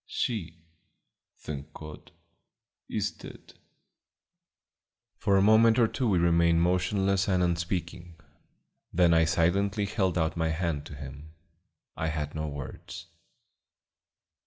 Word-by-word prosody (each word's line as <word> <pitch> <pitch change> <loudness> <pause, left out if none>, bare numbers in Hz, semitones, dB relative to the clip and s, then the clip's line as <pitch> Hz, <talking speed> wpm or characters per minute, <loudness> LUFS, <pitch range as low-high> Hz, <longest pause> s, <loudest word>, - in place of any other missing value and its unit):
"She, 85 -8 -3 0.7
thank 75 0 -8
God, 75 -1 -11 0.8
is - - -1
dead." - - -13 1.6
For 100 -2 +2
a 95 - +4
moment 110 +2 +5
or 120 -2 +5
two 125 +1 -1
we 95 - +3
remained 85 0 +3
motionless 95 +2 +1
and 90 -2 +2
unspeaking. 85 0 -3 0.8
Then 85 -1 +4
I 80 0 +4
silently 95 +5 +1
held 95 -3 0
out 80 -1 0
my 80 -1 0
hand 80 -3 -2
to 75 - -9
him. 70 +3 -10 0.6
I 80 - -2
had 75 -2 -3
no 80 0 -3
words. 70 +3 -8
85 Hz, 115 wpm, -28 LUFS, 80-95 Hz, 1.6 s, moment